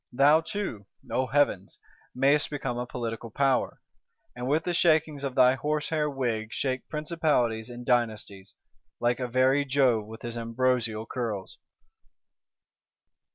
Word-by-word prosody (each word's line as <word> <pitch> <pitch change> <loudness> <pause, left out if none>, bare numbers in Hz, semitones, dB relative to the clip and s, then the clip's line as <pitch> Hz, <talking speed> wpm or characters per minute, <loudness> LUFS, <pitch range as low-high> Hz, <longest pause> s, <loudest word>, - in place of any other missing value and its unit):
Thou 145 +5 +5
too 160 - -5 0.2
(O 130 0 0
heavens!) 135 -9 +1 0.4
mayest 140 +3 +3
become 130 -4 -3
a 125 - -4
Political 115 -2 -5
Power; 135 +2 0 0.5
and 125 0 -5
with 155 +4 +1
the 175 - -2
shakings 155 -4 +2
of 135 -2 -3
thy 125 0 +6
horse 150 +3 -1
hair 155 -2 0
wig 120 -5 -2
shake 130 +1 -2
principalities 150 -8 0
and 120 0 -9
dynasties, 110 -6 -1 0.4
like 120 +1 +1
a 125 - -2
very 130 +3 +3
Jove 130 -6 +2
with 110 0 -11
his 120 0 -5
ambrosial 115 -1 0
curls! 110 -7 -5
125 Hz, 135 wpm, -27 LUFS, 115-145 Hz, 0.5 s, thy